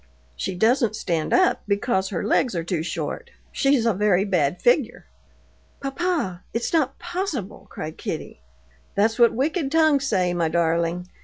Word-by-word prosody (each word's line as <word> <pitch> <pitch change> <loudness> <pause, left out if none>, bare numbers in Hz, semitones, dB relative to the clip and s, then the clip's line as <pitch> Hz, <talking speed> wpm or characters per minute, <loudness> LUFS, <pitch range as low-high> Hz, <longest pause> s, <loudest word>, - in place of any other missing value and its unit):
"She 180 - -3
doesn't 225 +2 +2
stand 165 -6 -2
up 370 -1 +3
because 200 -2 0
her 185 - -3
legs 225 0 +1
are 170 - -1
too 170 -1 -2
short. 460 - -4 0.2
She's 275 -4 +2
a 230 - +3
very 195 -1 +2
bad 180 -4 +1
figure." 245 0 +1 0.7
"Papa, 275 - -2
it's 235 +6 -2
not 275 -5 +1
possible!" 350 - -4
cried 155 0 -7
Kitty. - - -6 0.5
"That's 220 +4 +2
what 235 -1 +6
wicked 285 +3 -1
tongues 310 -4 +3
say, 185 -6 +1
my 170 -2 0
darling. 170 +1 0
215 Hz, 150 wpm, -23 LUFS, 180-275 Hz, 0.7 s, what